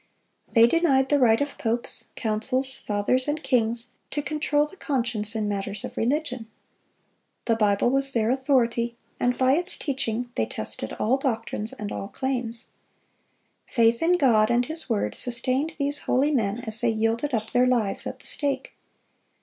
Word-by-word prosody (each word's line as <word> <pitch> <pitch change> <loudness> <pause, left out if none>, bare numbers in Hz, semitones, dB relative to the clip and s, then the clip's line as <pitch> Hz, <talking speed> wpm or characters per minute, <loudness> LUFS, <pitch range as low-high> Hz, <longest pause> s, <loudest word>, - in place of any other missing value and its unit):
They 230 -1 +7
denied 270 -2 +2
the 290 - +3
right 230 -3 +4
of 285 0 -3
popes, 235 +1 -1
councils, 255 +4 -1
Fathers, 210 +6 -1
and 300 +1 -2
kings, 240 -2 +1 0.2
to 295 - -3
control 300 -1 0
the 300 - -12
conscience 235 - -1
in 215 -1 -1
matters 200 0 -3
of - - -9
religion. 250 -2 -1 1.0
The 230 - +2
Bible 210 +2 +2
was 275 0 +6
their 230 -2 +1
authority, 240 -3 +1 0.2
and 245 0 +1
by 260 0 +3
its 355 +5 0
teaching 245 -4 -2
they 110 - -1
tested 110 0 -4
all 245 +5 +1
doctrines 225 -5 -2
and 210 -1 -6
all 195 - -5
claims. 245 -1 -2 1.0
Faith 230 -1 +2
in 350 +2 +3
God 225 -7 +4
and 240 +1 +2
His 315 0 -2
word 205 - 0
sustained 255 +6 0
these 285 0 0
holy 275 +4 +1
men 225 -4 0
as 220 -2 0
they 240 - +2
yielded 225 +5 0
up 220 0 -4
their 250 0 +3
lives 230 -6 0
at - - -6
the - - -15
stake. 280 -3 -1
245 Hz, 165 wpm, -25 LUFS, 225-275 Hz, 1.0 s, They